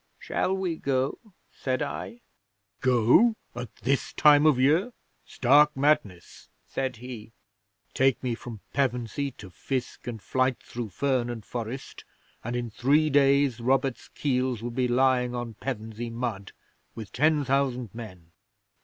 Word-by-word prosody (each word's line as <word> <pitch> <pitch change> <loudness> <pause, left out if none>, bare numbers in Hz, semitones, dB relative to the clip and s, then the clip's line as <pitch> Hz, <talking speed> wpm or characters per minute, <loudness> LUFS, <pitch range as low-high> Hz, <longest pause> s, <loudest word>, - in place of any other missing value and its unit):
'"Shall 190 +1 -1
we 180 -4 -2
go?" 135 -2 -1 0.3
said 130 +1 -2
I. 230 +11 -6 0.6
'"Go! 130 - +4 0.2
At 120 0 -7
this 135 +2 0
time 150 0 +6
of 150 -5 +4
year? 160 - +3 0.3
Stark 145 +3 +4
madness," 135 - 0 0.2
said 130 -2 -3
he. 115 -2 -9 0.6
"Take 135 -1 +2
me 125 -2 0
from 115 -3 -8
Pevensey 130 0 -1
to 95 -6 -12
fisk 125 +9 -4
and 115 -2 -4
flyte 130 +4 0
through 120 -2 -6
fern 130 +3 0
and 115 -3 -6
forest, 120 +2 -6 0.4
and 120 +2 -3
in 120 -2 -3
three 145 +7 +2
days 140 -3 +4
Robert's 130 +1 0
keels 125 -4 -1
would 120 0 -4
be 130 -1 +1
lying 125 0 +2
on 120 -2 -4
Pevensey 115 -2 -5
mud 115 -4 -4 0.4
with 110 -3 -8
ten 150 +2 +2
thousand 130 -4 0
men! 95 -8 -10
130 Hz, 135 wpm, -27 LUFS, 120-140 Hz, 0.6 s, time